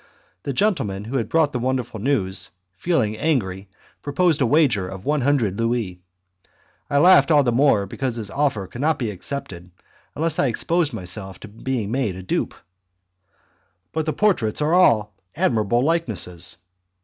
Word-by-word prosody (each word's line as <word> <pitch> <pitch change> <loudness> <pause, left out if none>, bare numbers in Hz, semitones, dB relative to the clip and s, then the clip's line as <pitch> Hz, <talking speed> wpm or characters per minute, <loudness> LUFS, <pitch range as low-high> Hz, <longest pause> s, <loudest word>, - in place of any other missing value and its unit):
The 140 - -3
gentleman 125 - 0
who 130 +5 -2
had 115 - -2
brought 160 -3 +2
the 125 - -1
wonderful 125 -2 -2
news, 95 -7 +1 0.3
feeling 120 - 0
angry, 100 -10 -1 0.3
proposed 155 +1 +1
a 130 - +3
wager 130 - +3
of 95 +1 -9
one 150 0 +1
hundred 120 -7 +1
louis. 115 -6 -1 0.9
I 140 - +1
laughed 145 -3 +6
all 150 -3 +5
the 120 - +1
more 120 -5 +3
because 125 +5 -3
his 110 -4 -4
offer 135 -8 0
could 120 +7 -8
not 155 +2 +2
be 115 -5 -2
accepted 95 -4 -7 0.5
unless 160 +1 0
I 140 - +3
exposed 165 +6 0
myself 95 -2 -6
to - - -9
being 110 0 -4
made 120 -7 -1
a 95 - -8
dupe. 95 - -2 1.4
"But 160 0 -2
the 155 - 0
portraits 180 - +1
are 150 +2 +1
all 110 - +4 0.2
admirable 120 - +1
likenesses." 110 - 0
125 Hz, 160 wpm, -22 LUFS, 105-145 Hz, 1.4 s, laughed